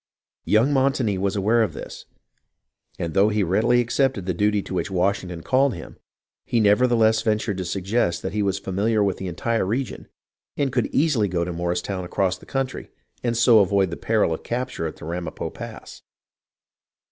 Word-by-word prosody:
Young 115 +7 +3
Montagnie 130 -7 +1
was 100 +1 0
aware 110 +4 +2
of 110 - 0
all - - -6
this; - - -10 0.9
and 85 -1 -3
though 100 +2 +4
he 105 -1 +1
readily 115 +7 +3
accepted 120 -4 0
the 90 - -1
duty 105 +2 +1
to - - -7
which 95 - -1
Washington 90 -2 -1
called 130 -1 +2
him, 80 - -10 0.4
he 120 - 0
nevertheless 110 +1 +4
ventured 105 -2 0
to 95 - -3
suggest 90 -1 -1
that 95 - -3
he 105 - 0
was 95 -1 0
familiar 100 +3 0
with 100 -1 0
the 95 - -5
entire 115 +7 -1
region, 115 +7 -3 0.5
and 140 -2 0
could 125 -3 +1
easily 140 -9 +2
go 85 -2 -1
to 90 - -4
Morristown 90 +2 -2
across 95 +1 0
the - - -16
country, 135 -1 -3 0.3
and 120 -1 0
so 115 -1 +6
avoid 95 -2 +2
the - - -3
peril 110 -6 +1
of - - -5
capture 120 -8 -3
at 80 - -9
Ramapo 85 +1 -5
Pass. - - -9
105 Hz, 180 wpm, -23 LUFS, 95-120 Hz, 0.9 s, so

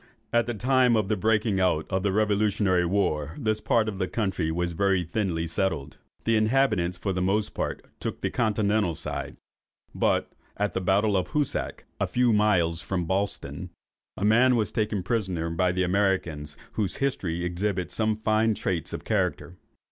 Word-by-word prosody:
At 120 -1 +3
the 120 - -2
time 125 +1 +3
of 105 -3 +1
the 110 - +2
breaking 105 0 +1
out 90 -4 +2
of 95 0 +1
the 100 0 +1
revolutionary 100 -3 +2
war 80 -5 0
this 110 -6 -1
part 110 -2 +2
of 100 -3 -4
the 95 - 0
country 95 -8 -1
was 85 +2 -1
very 95 +1 +2
thinly 85 -2 -1
settled. 80 -4 -2 0.3
The 115 - +2
inhabitants 110 -6 +2
for 95 +1 -2
the 90 - -1
most 100 +3 0
part - - -3
took - - -4
the - - -1
continental 105 -5 +1
side; - - -5 0.6
but - - +1 0.3
at 105 0 0
the 95 - -1
battle 100 +3 +2
of 95 - +1
Hoosac, 150 -2 -2
a - - +1
few 125 -2 +2
miles 90 -6 +2
from 90 0 -2
Ballston, 100 +4 -3 0.5
a 100 - -1
man 125 +4 +5
was 110 -3 0
taken 105 -4 -1
prisoner 95 -6 -1
by 90 +2 +1
the 90 +1 0
Americans, 90 -6 0
whose 105 -4 -2
history 90 -11 -1
exhibits 90 0 -2
some 110 -1 0
fine 110 0 +2
traits 85 -6 -2
of - - -5
character. 90 +2 -1
100 Hz, 170 wpm, -26 LUFS, 90-110 Hz, 0.6 s, man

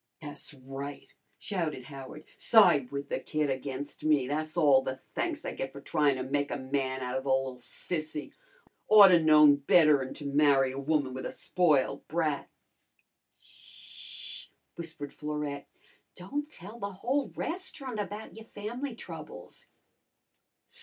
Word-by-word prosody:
"Tha's 145 -1 -7
right!" 135 +2 -8 0.3
shouted 160 -9 -3
Howard. 135 +3 -10
"Side 175 - +5
with 140 0 -5
the - - -1
kid 150 -2 -1
against 135 +1 -5
me! 150 -4 +3
Tha's 155 +3 -3
all 145 -5 +6
the 130 0 -3
thanks 310 - -4
I - - -3
get 135 - -4
for 140 - -9
tryin' 145 0 +2
to 130 - -3
make 145 +2 -1
a - - -2
man 130 -1 -2
out 125 0 -2
o' - - -2
the 135 - -5
li'l 130 -1 0
sissy. 155 +4 -5 0.6
Oughta 200 -5 +9
known 150 -2 +7
better'n 145 -2 +4
to 145 - -8
marry 140 -2 +4
a 135 - -5
woman 140 -2 0
with 130 - -4
a - - -5
spoiled 155 -7 +1
brat." 155 -3 -1 0.9
"Sh - - -10
h - - -27
h!" - - -37 0.2
whispered 165 -4 -7
Florette. 150 -2 -4 0.5
"Don't 285 +12 -4
tell 210 - -9
the 200 -2 -4
whole 260 +9 -1
resterunt 290 - -3
about 205 +2 -7
your 225 0 -11
fam'ly 235 +5 -5
troubles." - - -10
150 Hz, 150 wpm, -30 LUFS, 135-180 Hz, 0.9 s, Oughta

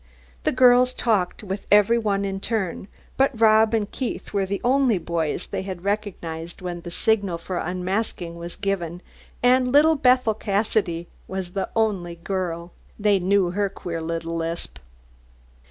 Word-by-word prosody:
The - - +3
girls 250 0 +5
talked 210 -6 0
with 195 0 -5
every 210 +3 +5
one 200 -3 0
in 195 0 -3
turn, 195 -4 -2 0.3
but 270 -4 +2
Rob 220 0 +5
and 210 -2 -1
Keith 255 - -4
were 195 -1 +1
the 200 +1 -2
only 255 -3 +3
boys 170 -1 -2
they - - -4
had 190 -2 -6
recognised 175 -5 -3
when 175 -2 -5
the 175 - -7
signal 200 -1 +1
for 175 +1 -4
unmasking 180 0 -2
was 170 0 -7
given, 180 -4 -3 0.4
and 250 0 +4
little 300 +4 +6
Bethel 250 -4 +3
Cassidy 200 -5 -1 0.2
was 190 -2 -4
the 195 +1 -3
only 195 -6 0
girl. 170 -1 -4 0.3
They 205 -2 +3
knew 185 -1 +2
her 200 +2 0
queer 170 -3 -5
little 165 0 -3
lisp. 165 +1 -4
195 Hz, 155 wpm, -24 LUFS, 175-220 Hz, 0.4 s, little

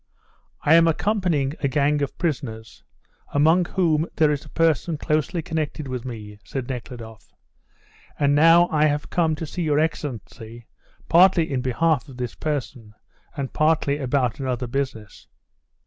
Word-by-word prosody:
"I 145 - +4
am 165 0 +6
accompanying 165 -6 0
a 140 - 0
gang 145 +1 +1
of 140 - -3
prisoners, 115 -9 -4 0.5
among 160 +5 +4
whom 165 -3 +1
there 155 -2 +3
is 145 0 -2
a - - -14
person 165 0 +1
closely 155 +3 -1
connected 155 -4 -3
with 130 -1 -5
me, 105 -4 -8
said 130 -3 -5
Nekhludoff, 120 -3 -8 0.8
and 145 -1 +2
now 165 +4 +6
I 155 -1 +3
have 145 0 -2
come 160 -3 +1
to 160 - -5
see 175 +4 -5
your 150 -3 +1
Excellency 120 -7 -4 0.4
partly 170 -2 +5
in 130 - 0
behalf 140 +1 0
of 130 - -12
this 125 -2 -4
person, 130 -8 -5 0.4
and 135 -2 -4
partly 155 -2 +1
about 130 -2 0
another 130 -2 -2
business." 120 -5 -5
145 Hz, 150 wpm, -23 LUFS, 125-160 Hz, 0.8 s, am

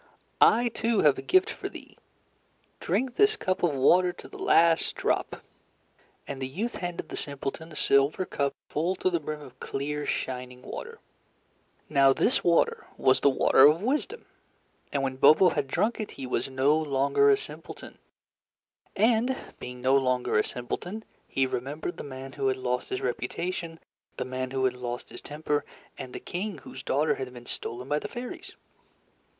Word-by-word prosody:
"I, 240 +2 +6
too, 230 -1 +1
have 145 -3 +4
a - - -4
gift 375 +4 +3
for - - -5
thee. - - -12 0.8
Drink 255 -1 -1
this 415 +1 +5
cup 185 - -1
of 165 -5 +2
water 180 +7 +4
to - - -12
the 410 - -12
last 170 - +3
drop." - - -1 0.8
And 135 -1 -6
the 130 - -2
youth 205 - -3
handed 175 -1 -5
the - - -5
simpleton 145 +3 -5
a - - -11
silver 140 +6 +2
cup 140 -4 -1
full 170 +5 -1
to 185 - 0
the 170 - +1
brim 150 0 -5
of 130 -3 -13
clear 145 +2 -3
shining 125 -1 -4
water. 465 -1 -7 0.9
Now 135 -2 +5
this 240 - +2
water 170 -1 +2
was 130 - +4
the 140 - +5
water 135 +1 +6
of 160 +6 +2
wisdom, 300 - -1 0.7
and 140 -1 0
when 130 -1 -2
Bobo 155 +7 +7
had 145 -2 -1
drunk 220 - 0
it, 215 - -3
he 135 - -5
was 125 - -2
no 135 +3 +3
longer 150 - +2
a 410 - +5
simpleton. 425 - -9 1.0
And 235 +5 +3 0.2
being 125 0 -8
no 130 +2 +3
longer 125 -2 +1
a 105 - +4
simpleton, 180 - -5 0.2
he 135 - +1
remembered 140 +7 -4
the - - -6
man 135 -1 -8
who 135 -2 -1
had 130 0 +1
lost 125 -1 -2
his 130 - -3
reputation, 165 +7 -3 0.4
the - - -2
man 130 0 -3
who 130 0 0
had 130 - +2
lost 125 -1 -6
his - - -9
temper, 150 0 -2 0.3
and 130 - -8
the - - -6
king 195 +3 -4
whose 130 - -10
daughter 145 +4 +1
had 130 -1 -5
been 120 -1 -12
stolen 125 +2 -5
by 150 +1 +1
the 210 - -5
fairies. 245 +3 -7
145 Hz, 175 wpm, -27 LUFS, 130-185 Hz, 1.0 s, Bobo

